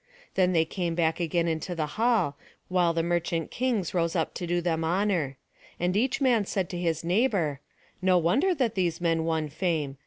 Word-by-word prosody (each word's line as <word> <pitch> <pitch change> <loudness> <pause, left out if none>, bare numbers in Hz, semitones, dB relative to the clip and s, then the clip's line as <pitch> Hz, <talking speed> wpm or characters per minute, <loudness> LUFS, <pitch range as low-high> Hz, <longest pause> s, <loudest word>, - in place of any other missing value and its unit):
Then 185 -1 +3
they 165 -1 +3
came 170 -1 -3
back 165 -1 +1
again 170 0 0
into 165 +2 -2
the 160 -2 -1
hall, 220 -10 +2 0.3
while 180 -2 +3
the 165 0 0
merchant 170 -1 -1
kings 235 -8 -1
rose 170 -1 0
up 165 -2 0
to 175 - -5
do 175 +1 +1
them 165 -2 -1
honour. 170 -5 0 0.4
And 180 +2 0
each 255 +6 +1
man 250 -6 +3
said 190 -3 -2
to 175 - -4
his 165 -2 -1
neighbour: 180 - +1 0.4
"No 185 -1 +4
wonder 255 - +2
that 250 -7 0
these 175 -3 0
men 165 -2 +1
won 160 -2 0
fame. 155 -3 -2
175 Hz, 190 wpm, -27 LUFS, 165-190 Hz, 0.4 s, No